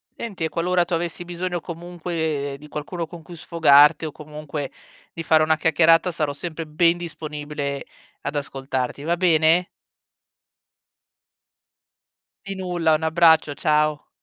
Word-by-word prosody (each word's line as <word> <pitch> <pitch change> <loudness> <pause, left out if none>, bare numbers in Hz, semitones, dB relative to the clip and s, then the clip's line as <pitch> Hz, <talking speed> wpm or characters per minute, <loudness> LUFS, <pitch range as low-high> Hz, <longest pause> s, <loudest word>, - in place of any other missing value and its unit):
Enti 200 -8 -6
e - - -2
qualora 175 +2 +1
tu 175 - -5
avessi 170 +1 -3
bisogno 175 0 -3
comunque, 165 -4 -4
ehm, - - -8
di 150 +2 -13
qualcuno 150 +4 -5
con 170 +1 -11
cui 175 +2 -12
sfogarti 155 -2 +5
o 155 - -4
comunque, 150 -1 -7 0.4
di 165 - -6
fare 160 -1 +4
una 155 0 +2
chiacchierata, 165 +2 +4
sarò 155 -3 -2
sempre 165 +2 -6
ben 165 +3 +2
disponibile 150 -4 -5 0.4
ad - - -4
ascoltarti, 135 -1 -3
va 170 +3 +1
bene? 170 0 +3 2.8
Di 195 0 -4
nulla. 175 -4 0
Un 155 - -3
abbraccio. 160 -2 +4
Ciao. 150 0 0
160 Hz, 135 wpm, -23 LUFS, 150-175 Hz, 2.8 s, sfogarti